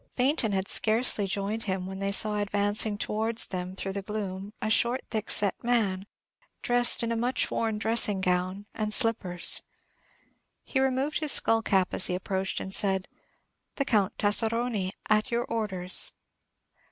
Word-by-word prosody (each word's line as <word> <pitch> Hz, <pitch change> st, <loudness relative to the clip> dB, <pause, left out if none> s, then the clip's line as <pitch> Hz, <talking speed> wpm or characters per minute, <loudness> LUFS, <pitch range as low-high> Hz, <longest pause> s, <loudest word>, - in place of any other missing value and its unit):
Baynton 255 Hz, -3 st, 0 dB
had 195 Hz, -1 st, -3 dB
scarcely 220 Hz, -2 st, +1 dB
joined 200 Hz, +3 st, -4 dB
him 190 Hz, -1 st, -3 dB
when 190 Hz, +1 st, -8 dB
they 195 Hz, 0 st, -2 dB
saw 210 Hz, +1 st, +2 dB
advancing 205 Hz, +1 st, -1 dB
towards 220 Hz, +2 st, 0 dB
them 185 Hz, 0 st, -6 dB
through 195 Hz, 0 st, -5 dB
the 200 Hz, -, -5 dB
gloom 200 Hz, -1 st, -6 dB
a -, -, -4 dB
short, 240 Hz, +3 st, 0 dB
thickset 210 Hz, -2 st, +1 dB
man, 205 Hz, -5 st, -1 dB, 0.6 s
dressed 245 Hz, -1 st, +5 dB
in 230 Hz, -, -3 dB
a -, -, -1 dB
much 245 Hz, +3 st, -2 dB
worn 220 Hz, -2 st, -2 dB
dressing 220 Hz, -2 st, +4 dB
gown 185 Hz, +2 st, -2 dB
and 215 Hz, -1 st, +2 dB
slippers. 210 Hz, -7 st, +4 dB, 1.0 s
He 265 Hz, -, -3 dB
removed 265 Hz, +3 st, -1 dB
his 305 Hz, -3 st, 0 dB
skull 225 Hz, 0 st, +2 dB
cap 190 Hz, -4 st, 0 dB
as -, -, +2 dB
he 180 Hz, -, -3 dB
approached, 190 Hz, +1 st, -4 dB
and 190 Hz, -, -6 dB
said, 190 Hz, -2 st, +1 dB, 0.7 s
"The 275 Hz, -, -2 dB
Count 210 Hz, -8 st, -1 dB
Tasseroni, 220 Hz, -1 st, 0 dB, 0.2 s
at 215 Hz, +3 st, 0 dB
your 235 Hz, 0 st, -2 dB
orders." 195 Hz, -6 st, +3 dB
210 Hz, 155 wpm, -26 LUFS, 190-230 Hz, 1.0 s, dressed